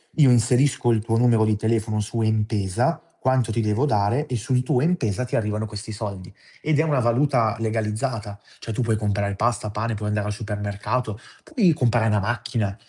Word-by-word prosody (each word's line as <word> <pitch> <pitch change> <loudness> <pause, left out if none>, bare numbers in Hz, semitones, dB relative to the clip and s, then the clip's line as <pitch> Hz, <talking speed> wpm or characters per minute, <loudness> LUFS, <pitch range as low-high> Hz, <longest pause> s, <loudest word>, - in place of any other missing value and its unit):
Io 145 -4 +6
inserisco 125 +1 +3
il 110 -2 +1
tuo 115 0 0
numero 115 -2 +4
di 110 0 +2
telefono 110 0 0
su 115 +2 -2
M-Pesa, 110 - 0 0.2
quanto 130 -3 +1
ti 115 - -1
devo 105 +5 +1
dare 115 +3 +1
e 125 - -2
sul 125 +3 0
tuo 125 - +1
M-Pesa 130 - 0
ti 125 - -4
arrivano 105 0 -1
questi 105 0 -7
soldi. 100 -4 -6 0.3
Ed 155 -1 +1
è - - +4
una 150 -4 +1
valuta 120 -2 +2
legalizzata, 110 -1 -2 0.2
cioè, 115 - -6
tu 115 - -1
puoi 115 -2 +1
comprare 100 -1 -1
pasta, 110 0 0
pane, 110 +2 -2
puoi 105 0 -4
andare 105 0 -1
al 105 - -2
supermercato, 105 +2 -3 0.2
puoi 220 - +2
comprare 120 -5 +2
una 105 -1 +2
macchina. 115 -2 -2
110 Hz, 185 wpm, -23 LUFS, 105-125 Hz, 0.3 s, Io